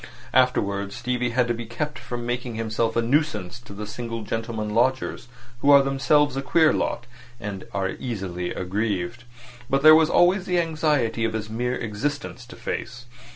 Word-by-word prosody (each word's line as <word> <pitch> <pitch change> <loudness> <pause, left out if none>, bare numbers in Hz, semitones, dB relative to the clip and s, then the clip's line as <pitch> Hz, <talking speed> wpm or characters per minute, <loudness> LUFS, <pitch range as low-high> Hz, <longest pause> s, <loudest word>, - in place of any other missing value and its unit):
Afterwards 100 -6 +2
Stevie 125 0 -1
had 120 0 +1
to 120 - +1
be 115 -1 -6
kept 140 +3 -4
from 120 0 -5
making 120 -1 -3
himself 115 0 -1
a 115 - +2
nuisance 120 - 0
to 120 - -14
the 105 +1 -6
single 115 +1 -5
gentlemen 110 -1 -3
lodgers, 125 +1 0 0.3
who 140 - +2
are 140 -1 +8
themselves 135 +1 +2
a 135 - -1
queer 155 +3 +4
lot, 120 - -1 0.3
and 100 -4 -6
are 95 -1 -1
easily 95 -7 -4
aggrieved. 100 +3 -2 0.5
And 135 0 +3
there 155 0 +10
was 160 0 +5
always 180 +2 +3
the 180 -1 +2
anxiety 150 -8 +1
of 115 -1 0
his 110 -1 -4
mere 125 +2 -1
existence 120 +3 -4
to - - -11
face. 120 0 -5
120 Hz, 170 wpm, -24 LUFS, 110-135 Hz, 0.5 s, there